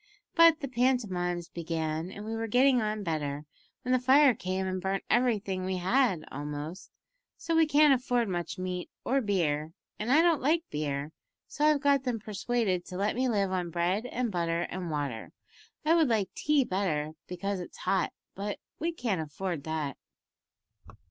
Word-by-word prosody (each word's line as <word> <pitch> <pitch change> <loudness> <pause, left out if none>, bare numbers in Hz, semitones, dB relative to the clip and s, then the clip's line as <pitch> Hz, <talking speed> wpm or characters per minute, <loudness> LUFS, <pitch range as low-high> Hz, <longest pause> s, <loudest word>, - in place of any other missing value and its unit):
But 335 -1 +6
the 275 - -2
pantomimes 205 -9 0
began 160 0 -3
and 205 +2 -8
we 225 +1 -3
were 225 0 -2
getting 250 +2 +4
on 215 -1 -2
better, 150 -4 -2 0.4
when 255 - -2
the 255 - +4
fire 265 +2 +6
came 185 -1 -3
and 185 0 -2
burnt 195 +1 -1
everything 210 -6 +1
we 185 0 -1
had 190 - +2
almost, 150 +5 -6 0.5
so 330 0 -2
we 325 -1 +5
can't 300 -1 +6
afford 245 -2 +1
much 175 0 -3
meat 180 -1 -4 0.2
or 270 +2 +2
beer, 160 - 0 0.3
and 215 +4 -1
I 310 +4 +6
don't 335 -4 +3
like 320 +5 +2
beer, 145 0 -2 0.4
so 295 - -1
I've 300 -2 +4
got 280 -2 +3
them 250 -3 -1
persuaded 210 -3 -1
to 180 - -7
let 205 +3 0
me 255 +1 +1
live 200 -4 +1
on 180 -2 -1
bread 180 +7 0
and 245 -2 -2
butter 170 -2 0
and 180 -2 -4
water. 145 -7 -4 0.5
I 320 - +5
would 330 -3 +4
like 220 -5 0
tea 300 -2 +2
better, 175 -8 -1 0.2
because 190 +2 -3
it's 180 - -8
hot, 190 -2 0 0.2
but 200 +1 -4 0.2
we 330 +2 0
can't 230 - -2
afford 160 +1 -4
that." 155 -4 -3
195 Hz, 175 wpm, -29 LUFS, 175-250 Hz, 0.5 s, But